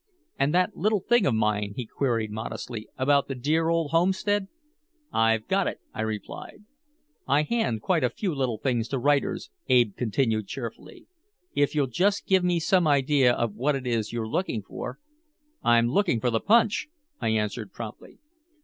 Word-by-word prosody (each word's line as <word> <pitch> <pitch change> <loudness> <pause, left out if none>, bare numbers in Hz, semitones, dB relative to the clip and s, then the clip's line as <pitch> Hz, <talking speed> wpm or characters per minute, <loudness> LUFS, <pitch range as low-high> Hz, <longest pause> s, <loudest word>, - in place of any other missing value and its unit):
"And 140 +2 +2
that 180 +2 +2
little 210 +1 +1
thing 240 0 +3
of 125 - +2
mine," 105 -2 0
he 125 - -4
queried 115 -3 -1
modestly, 110 0 -6
"about 140 +1 +3
the 135 - -4
dear 155 +6 +1
old 165 -3 0
homestead." 190 +4 +1 0.7
"I've 115 -1 +2
got 195 0 +1
it," - - -4
I - - -4
replied. 110 - -6 0.6
"I 145 +2 +3
hand 150 - -1
quite 175 -6 +1
a 125 - +3
few 190 - -3
little 130 -5 -1
things 120 -1 -1
to 135 - -2
writers," 140 - 0 0.2
Ab 120 -5 +4
continued 110 -3 0
cheerfully. 120 -2 -8 0.5
"If 145 +1 +1
you'll 145 -2 +3
just 190 - +1
give 190 -1 +3
me 175 -1 +2
some 175 +1 +2
idea 140 -2 +4
of 120 -3 -1
what 135 +7 0
it 135 -1 -5
is 115 -3 -1
you're 115 -2 -3
looking 115 - -2
for - - -7 0.3
" - - -47 0.3
"I'm 120 0 +4
looking 165 - +2
for 120 +2 0
the 115 - +1
punch," 220 - +3 0.3
I - - -2
answered 105 0 -1
promptly. 115 -3 -9
130 Hz, 175 wpm, -26 LUFS, 115-165 Hz, 0.7 s, Ab